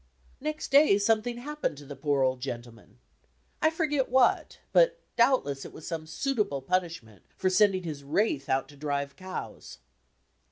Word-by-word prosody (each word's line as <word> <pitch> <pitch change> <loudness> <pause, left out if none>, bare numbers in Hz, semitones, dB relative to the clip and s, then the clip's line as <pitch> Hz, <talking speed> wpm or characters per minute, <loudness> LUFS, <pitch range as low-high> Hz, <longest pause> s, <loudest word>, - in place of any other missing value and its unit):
Next 305 +1 -4
day 280 -7 +6
something 225 +3 +1
happened 295 - -3
to 145 - -11
the 140 +1 -8
poor 140 0 +1
old 130 -1 0
gendeman. 120 - -8 0.6
I 315 - +5
forget 300 -5 0
what, 255 0 +2 0.2
but - - +4 0.2
doubdess 235 - +2
it - - -10
was 155 - -11
some 160 -2 -5
suitable 205 - -1
punishment 165 - -2 0.2
for 185 0 +1
sending 190 -1 +3
his 150 -4 -6
wraith 145 -1 0
out 135 0 +1
to 145 - -14
drive 140 -1 -3
cows! 185 - -8
180 Hz, 155 wpm, -28 LUFS, -, 0.6 s, day